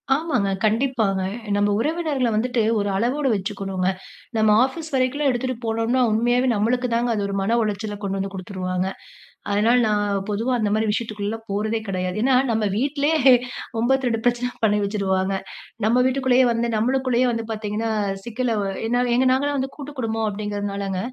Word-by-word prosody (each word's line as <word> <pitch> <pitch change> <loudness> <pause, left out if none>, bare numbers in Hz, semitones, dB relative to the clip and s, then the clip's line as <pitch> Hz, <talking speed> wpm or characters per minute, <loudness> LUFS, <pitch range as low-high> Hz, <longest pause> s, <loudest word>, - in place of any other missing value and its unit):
ஆமாங்க. 270 -10 0 0.2
கண்டிப்பாங்க. 220 -4 +1 0.3
நம்ம 205 0 +2
உறவினர்கள 300 -2 0
வந்துட்டு 245 +1 +1 0.2
ஒரு 205 0 -1
அளவோடு 260 +6 0
வச்சுக்கணுங்க. 195 -2 -2 0.5
நம்ம 220 -1 +4
ஆஃபீஸ் 315 +4 -7
வரைக்குலாம் 270 +3 +1
எடுத்துட்டு 255 +1 -2
போனோம்னா, 225 +3 +1
உண்மையாவே 240 +3 +2
நம்மளுக்கு 245 +4 +1
தாங்க, 235 +1 +1
அது 205 - -1
ஒரு 200 - -4
மன 225 +5 +1
உளச்சல 210 0 -2
கொண்டு 195 0 -2
வந்து 195 0 -3
குடுத்துருவாங்க. 185 -1 -3 0.6
அதனால 220 +4 +3
நான் 205 -2 0
பொதுவா 220 +5 -1
அந்த 210 -2 0
மாரி 220 0 +1
விஷயத்துக்குள்ளலாம் 215 0 -3
போறதே 215 +3 -1
கிடையாது. 185 -1 -2
ஏன்னா 260 -1 +4 0.2
நம்ம 220 -1 +1
வீட்டிலயே 285 +5 +1
ஹே 260 - +9 0.5
92 245 -2 +1
பிரச்சன 245 0 +1
பண்ணி 210 -1 +3
வச்சுறுவாங்க. 195 -2 0 0.5
நம்ம 230 +3 +3
வீட்டுக்குள்ளேயே 260 -1 +3
வந்து 230 0 0
நம்மளுக்குள்ளேயே 255 +2 +1
வந்து 230 -1 -3
பாத்தீங்கன்னா, 215 +1 -3 0.3
சிக்கலவு 230 -3 -1 0.2
ஏன்னா 245 +1 +1 0.2
எங்க 260 +2 +3
நாங்கலாம் 285 +2 0
வந்து 265 +1 -3
கூட்டு 290 -1 -7
குடும்பம் 225 -1 -1
அப்டிங்கிறதுனாலங்க, 200 -2 -3
225 Hz, 150 wpm, -22 LUFS, 205-255 Hz, 0.6 s, ஹே